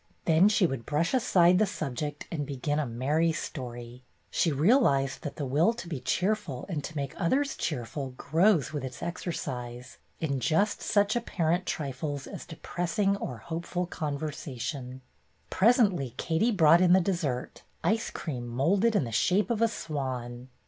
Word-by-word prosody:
Then 165 +5 +5
she 210 -3 +3
would 135 -7 -3
brush 155 - 0
aside 180 -8 +4
the 215 - +3
subject 150 -5 -4
and 155 -4 -2
begin 145 +2 -2
a 150 - -1
merry 145 +8 +1
story. 120 -5 -6 0.3
She 165 - +2
realized 145 - +3
that 145 - -5
the 145 - -3
will 150 - +3
to 230 -6 -8
be 155 -6 -4
cheerful 180 - -1
and 160 -7 -3
to 160 - -8
make 140 -2 -3
others 275 +11 +1
cheerful 130 -1 -4
grows 160 0 +2
with 145 -3 -3
its 130 -2 -6
exercise 125 -8 -5 0.2
in 140 -4 -1
just 200 - +1
such 205 +1 +2
apparent 180 -6 0
trifles 145 -1 -3
as - - -8
depressing 175 +4 -1
or 125 -10 -5
hopeful 170 +2 -3
conversation. 140 -5 -5 0.5
Presently 195 - +3
Katie 170 +9 +1
brought 170 -4 +6
in 180 -1 +6
the 190 - +7
dessert, 170 -9 -2 0.2
ice 225 +1 +1
cream 125 -7 -5
moulded 190 - +2
in 200 - +3
the 115 - -5
shape 190 - +2
of 225 -1 0
a 230 - +5
swan. 130 - -4
155 Hz, 155 wpm, -28 LUFS, 135-185 Hz, 0.5 s, the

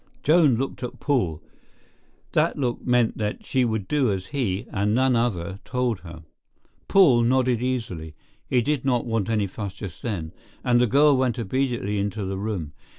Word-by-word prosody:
Joan 155 -4 +5
looked 135 +4 -3
at 125 - -6
Paul. 95 - 0 0.9
That - - +1
look 125 -4 -2
meant 120 -3 +2
that 105 -1 -3
she 130 -1 +1
would 110 -5 -1
do 140 -7 +2
as 95 -1 -4
he, 115 -6 -1
and 105 +1 0
none 130 0 +3
other, 100 -6 -1
told 125 -5 -1
her. 85 -2 -11 0.6
Paul 150 -12 +6
nodded 125 0 +2
easily—he 115 - -3
did 145 0 0
not 125 -3 +1
want 115 -3 -1
any 110 -3 +1
fuss 100 0 -6
just 100 -5 -8
then—and 110 +5 -2
the 125 - +4
girl 145 +4 +5
went 130 -2 +1
obediently 115 -3 -1
into 100 0 -2
the 95 0 -3
room. 95 -8 -4
115 Hz, 160 wpm, -24 LUFS, 100-130 Hz, 0.9 s, Paul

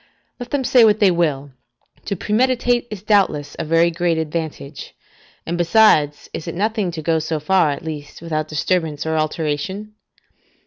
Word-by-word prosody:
Let 245 -1 -7
them 285 -2 -1
say 250 -1 +5
what 215 -1 +4
they 200 -4 +5
will: 145 -5 -1 0.5
to 200 - -2
premeditate 240 +4 +1
is 205 -3 -8
doubtless 190 -9 +1
a - - -1
very 165 +2 +3
great 170 0 0
advantage; 155 -3 -5 0.5
and 170 +1 -3
besides, 170 -6 +3
is 160 - -6
it 170 - -4
nothing 210 0 0
to 165 -2 -6
go 160 0 +1
so 160 0 -2
far, 175 +1 +2
at 140 - -4
least, 150 -2 -7
without 155 -2 -3
disturbance 155 -1 -1
or 160 0 -1
alteration? 160 +6 -2
165 Hz, 165 wpm, -20 LUFS, 155-205 Hz, 0.5 s, say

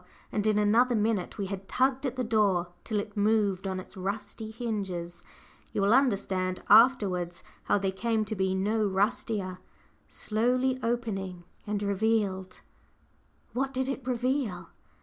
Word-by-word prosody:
And 210 0 0
in 215 -1 +3
another 230 +4 +4
minute 210 -4 0
we 200 - -2
had 195 0 -6
tugged 265 +1 +1
at 255 - -4
the 255 - -1
door 205 -6 +2
till 215 -2 -1
it 205 0 -6
moved 205 -2 +2
on 190 -1 -2
its 185 - -11
rusty 205 +3 -4
hinges 200 -7 -4 0.5
you - - 0
will 200 +3 +4
understand 195 -8 +1
afterwards 200 -7 +4 0.2
how - - +3
they 195 -1 0
came 220 +2 0
to 215 - -3
be 190 -1 0
no 210 +3 +1
rustier 200 -1 0 0.5
slowly 250 +4 0
opening 195 -7 -2 0.2
and 205 0 -1
revealed 200 -2 0 0.9
What 270 +2 -1
did 260 0 0
it 270 0 -3
reveal? 250 -6 -1
210 Hz, 145 wpm, -29 LUFS, 190-235 Hz, 0.9 s, another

